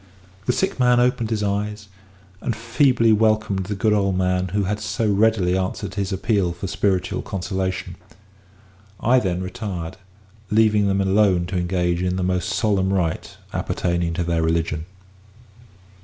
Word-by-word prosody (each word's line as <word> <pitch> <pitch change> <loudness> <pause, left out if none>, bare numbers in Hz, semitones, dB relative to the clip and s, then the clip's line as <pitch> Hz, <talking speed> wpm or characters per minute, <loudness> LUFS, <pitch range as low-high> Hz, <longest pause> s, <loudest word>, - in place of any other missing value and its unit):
The - - +4
sick 190 +2 -1
man 125 -1 +4
opened 125 -2 +1
his 110 -2 -1
eyes, 105 +1 -2 0.5
and 120 - -2
feebly 115 0 +3
welcomed 110 -3 +1
the 105 - -2
good 105 +2 +2
old 100 -3 +1
man 90 0 +1
who 100 +3 -1
had 105 +2 -2
so 100 +4 -1
readily 100 -3 +2
answered 95 +1 -3
his 100 0 -2
appeal 95 -2 0
for 85 +3 -7
spiritual 95 -1 0
consolation. 95 -1 -3 1.0
I 125 +3 +4
then 95 -4 -2
retired, 90 -4 -5 0.5
leaving 105 -1 +3
them 100 0 +1
alone 95 -2 +3
to 90 +2 -5
engage 90 -1 0
in 90 0 0
the 95 - -1
most 90 0 0
solemn 95 -3 +1
rite 90 -4 -2 0.2
appertaining 85 -1 -1
to 90 - 0
their 85 -1 0
religion. 80 0 -1
95 Hz, 150 wpm, -22 LUFS, 90-110 Hz, 1.0 s, The